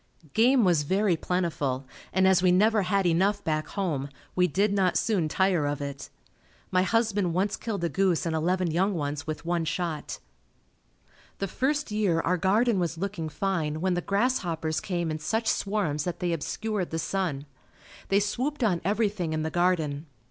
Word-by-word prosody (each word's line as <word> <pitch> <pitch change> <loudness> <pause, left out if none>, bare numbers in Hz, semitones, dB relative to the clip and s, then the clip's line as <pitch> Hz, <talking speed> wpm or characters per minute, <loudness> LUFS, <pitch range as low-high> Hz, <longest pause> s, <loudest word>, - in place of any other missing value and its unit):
Game 245 +2 +4
was 175 -5 +3
very 190 +5 +2
plentiful 155 -7 -1 0.3
and 190 0 +3
as 190 -1 +4
we 185 -1 +4
never 210 +4 +4
had 195 +1 +1
enough 190 +4 +2
back 155 -1 -1
home, 150 -8 -2 0.3
we 180 0 +4
did 200 +5 +1
not 190 -3 +2
soon 185 -9 +1
tire 180 -3 +2
of 145 -1 -2
it. 140 -1 -6 0.6
My 185 - +3
husband 205 -3 +1
once 200 +2 +1
killed 205 -6 -4
a - - +2
goose 185 +1 +1
and 165 -1 -1
eleven 175 +2 +1
young 190 +4 +1
ones 145 -1 -3
with 155 +1 -5
one 170 -1 0
shot. 160 -1 -3 1.2
The 195 - -2
first 285 +4 -1
year 205 -6 +1
our 180 +3 +1
garden 205 +4 +2
was 170 -2 -1
looking 185 -3 -3
fine 155 -4 -1
when 185 +2 +1
the 175 - -1
grasshoppers 175 -8 0
came 175 -4 -2
in 155 - -3
such 225 +9 -1
swarms 175 -8 0
that 175 -1 -3
they 175 -1 0
obscured 200 +4 -2
the 160 - -3
sun. 165 -5 -2 0.6
They 195 - +3
swooped 255 +7 -2
on 180 -6 +2
everything 200 -4 0
in 155 0 -1
the 160 - -2
garden. 165 -4 0
180 Hz, 175 wpm, -27 LUFS, 160-200 Hz, 1.2 s, Game